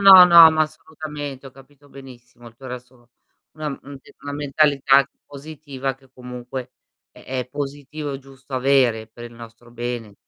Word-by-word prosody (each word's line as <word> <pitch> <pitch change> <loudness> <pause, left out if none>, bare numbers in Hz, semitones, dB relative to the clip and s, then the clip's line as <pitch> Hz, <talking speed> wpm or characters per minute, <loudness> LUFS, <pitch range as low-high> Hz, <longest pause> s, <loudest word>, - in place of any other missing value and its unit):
no, 190 -2 +11
no 170 -2 +9
ma 155 0 +2
assolutamente 150 -3 -7
ho - - -10
capito 140 +1 -19
benissimo 120 -3 -14
il 115 - -21
tuo 130 - -12
resto 125 -1 -11 0.4
una 155 -1 -5
mhmm, 140 0 -8
d 135 - -18
una 145 - -5
mentalità 140 -1 +3 0.2
positiva 140 -2 -6
che 135 -1 -25
comunque 125 0 -8 0.4
è - - -17
è 130 -1 -4
positivo 145 +2 -6
e - - -5
giusto 135 0 -12
avere 125 -4 +2
per 120 +1 -12
il 120 0 -11
nostro 115 +1 -13
bene, 120 -3 -5
135 Hz, 165 wpm, -22 LUFS, 125-145 Hz, 0.4 s, no